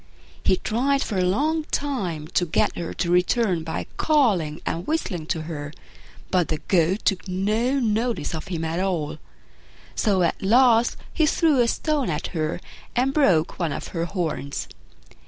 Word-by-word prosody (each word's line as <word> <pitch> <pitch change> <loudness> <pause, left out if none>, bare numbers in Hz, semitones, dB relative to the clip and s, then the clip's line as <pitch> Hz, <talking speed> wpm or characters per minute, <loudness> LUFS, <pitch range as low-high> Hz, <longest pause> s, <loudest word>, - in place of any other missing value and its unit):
He - - +4
tried 270 +8 +1
for 195 - -2
a - - +3
long 300 - +1
time 190 - -2
to 175 -1 +1
get - - +1
her 170 - -4
to 170 - -2
return 180 0 +2
by 160 - -4
calling 200 - +2
and 170 +3 -3
whistling 185 - -2
to 160 -2 -2
her, 150 -3 -6 0.6
but 180 -3 +2
the 155 - -1
Goat 170 +4 +1
took 195 -1 +1
no 215 +8 +1
notice 230 -2 0
of 160 - -5
him 165 -3 -3
at 165 +2 -2
all; 180 -6 -1 0.7
so 195 -4 +2
at 170 - 0
last 235 +2 +4 0.2
he 315 -2 +3
threw 300 -4 +3
a 235 - +3
stone 295 - 0
at 155 +1 -2
her 155 0 -1 0.4
and 260 +3 +2
broke 185 - +2
one 170 -4 0
of - - -5
her 165 -1 -2
horns. 165 -6 -3
190 Hz, 165 wpm, -24 LUFS, 165-245 Hz, 0.7 s, He